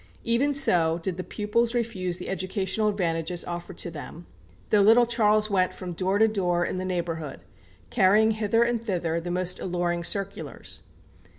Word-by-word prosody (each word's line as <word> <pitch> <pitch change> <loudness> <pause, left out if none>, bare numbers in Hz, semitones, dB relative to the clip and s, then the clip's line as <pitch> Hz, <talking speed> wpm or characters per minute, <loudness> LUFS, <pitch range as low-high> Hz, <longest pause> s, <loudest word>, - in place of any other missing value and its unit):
Even 235 +5 +2
so 180 -13 +3
did 180 -1 -2
the 185 - -3
pupils 230 +4 -1
refuse 190 -7 -1
the - - -7
educational 190 +3 -1
advantages 175 -3 -2
offered 175 +1 -6
to 170 - -2
them, 165 +2 -9 0.5
though 210 - +5
little 225 +4 +6
Charles 215 -2 +2
went 185 -2 +2
from 180 -2 -6
door 190 +3 0
to 220 +1 +5
door 175 -5 0
in 185 - -3
the 185 - -3
neighbourhood, 165 -5 -3 0.5
carrying 215 +1 +4
hither 220 +1 +2
and 235 -1 -1
thither 170 -6 -1
the 175 +1 -6
most 180 0 -1
alluring 175 -1 -1
circulars. 195 +3 -3
190 Hz, 165 wpm, -26 LUFS, 175-220 Hz, 0.5 s, little